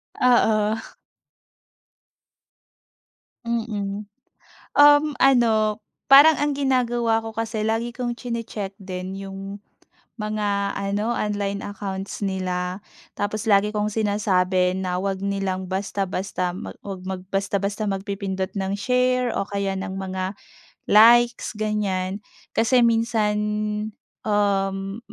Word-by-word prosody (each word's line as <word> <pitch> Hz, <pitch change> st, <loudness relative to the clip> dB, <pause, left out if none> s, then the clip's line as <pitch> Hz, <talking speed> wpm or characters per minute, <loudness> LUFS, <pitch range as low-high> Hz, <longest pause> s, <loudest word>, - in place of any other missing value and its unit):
Oo. 220 Hz, -3 st, +3 dB, 2.7 s
Mm. 210 Hz, -3 st, -3 dB, 0.7 s
Uhm, 290 Hz, +1 st, +6 dB
ano 225 Hz, -5 st, +4 dB, 0.3 s
parang 290 Hz, +3 st, +9 dB
ang 295 Hz, -, +2 dB
ginagawa 240 Hz, -4 st, +1 dB
ko 225 Hz, -, -6 dB
kasi 220 Hz, -1 st, -3 dB
lagi 225 Hz, +2 st, -1 dB
kong 240 Hz, -1 st, -3 dB
tsini-tsek 230 Hz, -5 st, -5 dB
din 185 Hz, 0 st, -5 dB
yung 195 Hz, +1 st, -7 dB, 0.6 s
mga 205 Hz, -2 st, -1 dB
ano 205 Hz, +4 st, -1 dB
online 200 Hz, -1 st, -2 dB
accounts 195 Hz, -1 st, -5 dB
nila. 185 Hz, -1 st, -2 dB, 0.3 s
Tapos 210 Hz, +2 st, -3 dB
lagi 205 Hz, 0 st, +4 dB
kong 210 Hz, 0 st, -1 dB
sinasabi 190 Hz, -4 st, +1 dB
na, 180 Hz, -1 st, -2 dB
'wag 195 Hz, 0 st, -2 dB
nilang 195 Hz, -2 st, -2 dB
basta-basta 190 Hz, -1 st, -2 dB
mag 185 Hz, -, -7 dB
'wag 195 Hz, -2 st, -6 dB
mag 190 Hz, -1 st, -4 dB
basta-basta 200 Hz, +2 st, -1 dB
magpipindot 195 Hz, -1 st, -3 dB
ng 195 Hz, -1 st, -2 dB
share 250 Hz, +2 st, +1 dB
o 200 Hz, -, -2 dB
kaya 200 Hz, -1 st, -2 dB
ng 190 Hz, -1 st, -5 dB
mga, 190 Hz, 0 st, -4 dB, 0.6 s
likes 235 Hz, +2 st, +6 dB
ganyan. 200 Hz, -3 st, -1 dB, 0.3 s
Kasi 245 Hz, +2 st, +3 dB
minsan 225 Hz, -2 st, +2 dB, 0.9 s
uhm, 195 Hz, -1 st, 0 dB
205 Hz, 105 wpm, -23 LUFS, 195-225 Hz, 2.7 s, parang